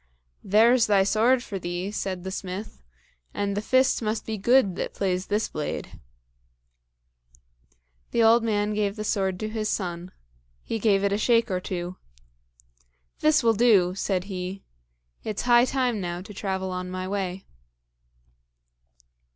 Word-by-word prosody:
"There's 230 +4 +4
thy 200 -2 +4
sword 235 +5 +3
for 200 -6 -5
thee," 175 +2 -4
said 190 -3 -4
the 190 - -5
smith, 190 - -6 0.5
"and 200 -1 -1
the 205 - -1
fist 260 +4 +2
must 215 0 -2
be 220 - -3
good 215 -1 +3
that - - -4
plays 185 -1 -1
this 210 +2 0
blade." 150 -1 -5 2.1
The 230 - +2
old 225 +1 +5
man 210 -2 0
gave 205 -1 -1
the 215 - -5
sword 190 -3 -1
to 215 - -2
his 215 -1 -3
son; 175 -2 -3 0.5
he 225 - -3
gave 200 -2 +2
it 200 0 +1
a 205 - 0
shake 230 -1 +2
or 185 - 0
two. 180 0 -5 1.2
"This 310 -2 +3
will 230 -1 +4
do," 205 -6 +4
said 190 -1 -1
he; 190 0 -6 0.6
"it's 215 -2 -3
high 240 0 +5
time 250 -5 0
now 175 -1 -4
to 205 - -11
travel 190 -1 -3
on 180 0 -4
my 185 0 -4
way." 190 -1 -3
200 Hz, 150 wpm, -25 LUFS, 185-225 Hz, 2.1 s, old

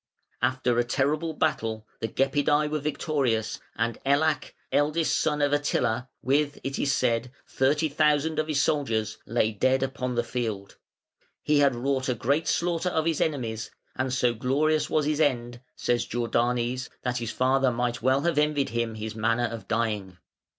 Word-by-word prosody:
After 125 -2 +1
a - - +4
terrible 150 +6 0
battle 115 -9 -1
the 115 - -1
Gepidæ 145 +4 +1
were 155 - 0
victorious, 140 -6 -1 0.2
and 115 0 -1
Ellak, 145 +2 +1 0.2
eldest 155 +3 +2
son 150 -1 +1
of 145 0 +2
Attila, 130 -4 0
with, 145 +2 +1
it 135 0 -3
is 140 - +1
said, 120 -2 +1 0.2
thirty 145 +4 +1
thousand 150 +1 +2
of 155 - 0
his 150 -3 0
soldiers, 115 -9 0
lay 110 -1 +1
dead 130 +5 +2
upon 130 -2 -3
the 120 - +1
field. 110 -5 -4 0.7
"He 150 -1 +3
had 140 -3 +4
wrought 130 +2 -1
a 125 - +1
great 140 +7 0
slaughter 175 +1 0
of 160 -3 0
his 165 -2 0
enemies, 115 -8 -2 0.3
and 130 0 -1
so 125 -2 +2
glorious 150 +6 +1
was 155 -2 +1
his 150 +1 0
end", 120 -4 0
says 120 -1 0
Jordanes, 120 +1 0
"that 125 -1 -1
his 115 -2 -3
father 130 +1 +2
might 120 -1 -1
well 130 +3 +3
have 170 -1 +1
envied 150 -2 +1
him 115 -1 -2
his 110 0 -5
manner 115 +2 +1
of 115 -4 -6
dying". 105 -5 -1
130 Hz, 165 wpm, -27 LUFS, 120-150 Hz, 0.7 s, a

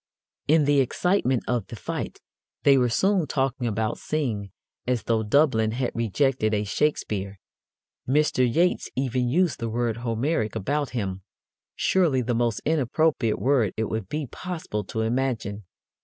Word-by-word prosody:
In 155 0 +4
the 145 0 +4
excitement 135 - +1
of 120 -5 -1
the - - -8
fight 95 - -5 0.4
they 140 - +6
were 125 -2 +3
soon 190 - +2
talking 135 -3 -1
about 110 +1 -1
Synge 115 -10 -2 0.4
as 125 -2 0
though 115 -1 +1
Dublin 110 -2 +3
had 125 +1 -1
rejected 115 0 +1
a 105 - 0
Shakespeare. 100 -5 -1 0.7
Mr. 135 -3 +3
Yeats 175 +7 +1
even 130 -1 0
used 175 +4 +1
the 115 - -2
word 115 0 -1
"Homeric" 115 0 -1
about 140 +7 -1
him 95 -3 -3 0.5
surely 160 -9 +2
the 120 +1 -1
most 115 -2 0
inappropriate 145 -5 +1
word 120 -3 +1
it 110 0 -1
would 110 -4 -3
be 150 -1 -2
possible 160 - -5
to 110 - -3
imagine. 110 -4 -1
125 Hz, 145 wpm, -25 LUFS, 110-145 Hz, 0.7 s, they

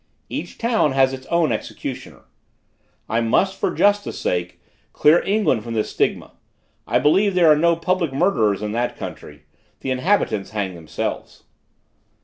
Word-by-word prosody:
Each - - -6
town 225 - +1
has 135 0 +3
its 130 0 -8
own 170 -5 +1
executioner. 110 - -6 0.8
I 115 +1 0
must, 190 +12 +1
for - - +1
justice 205 0 +1
sake, 90 0 -2 0.3
clear 155 +3 +4
England 200 - +1
from 115 0 -5
this 110 - -1
stigma; - - -1 0.6
I - - +2
believe 195 +6 +3
there 170 -3 +6
are - - +7
no 170 +2 +3
public 170 -2 -1
murderers 110 - +1
in 105 - -3
that 120 +2 -2
country: 75 0 -9 0.4
the 135 - -3
inhabitants 130 - 0
hang 100 -3 -3
themselves. 85 -3 -6
135 Hz, 145 wpm, -21 LUFS, -, 0.8 s, are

